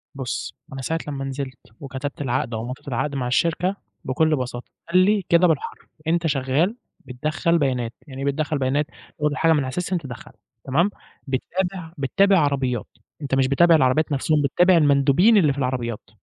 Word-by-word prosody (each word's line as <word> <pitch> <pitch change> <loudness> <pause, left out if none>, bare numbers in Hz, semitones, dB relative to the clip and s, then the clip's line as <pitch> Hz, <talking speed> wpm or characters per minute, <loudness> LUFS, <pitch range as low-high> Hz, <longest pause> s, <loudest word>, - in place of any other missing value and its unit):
بُصّ 130 -3 -4 0.2
أنا 135 - -5
ساعة 165 +5 -2
لمّا 140 -2 -4
نزلت 135 -1 -5 0.2
وكتبت 140 +1 -6
العقد 125 -3 -1
أو 110 0 -3
مضيت 125 +3 -8
العقد 140 +2 -2
مع 125 -3 -2
الشركة، 170 +8 +1 0.3
بكلّ 155 +4 +2
بساطة 125 -2 -5 0.2
قال 180 - +4
لي 205 0 +3
كده 170 +1 +5
بالحرف، 160 -4 -2 0.2
"أنت 170 0 +1
شغال 145 - +1 0.3
بتدخّل 155 +6 0
بيانات" 125 -6 -1
يعني 135 -1 -8
إيه - - -2
بتدخّل 150 +1 -1
بيانات؟ 135 +3 +1 0.3
تاخد 150 0 +1
الحاجة 165 +2 +3
من 150 -3 +1
علي 130 - -4
الSystem 180 +4 -1
تدخّلها 130 -7 -9 0.3
تمام، 160 +9 +2 0.4
بتتابع 175 +5 -3
بتتابع 195 +8 +3
عربيات، 135 -5 0 0.3
أنت 140 -2 -1
مش 135 -1 +3
بتتابع 165 +5 +5
العربيات 145 +2 +2
نفْسهم، 150 +2 +1
بتتابع 175 +6 +4
المندوبين 145 +8 +4
اللي 155 -7 +4
في - - -11
العربيات، 125 -6 -3
140 Hz, 170 wpm, -23 LUFS, 130-165 Hz, 0.4 s, كده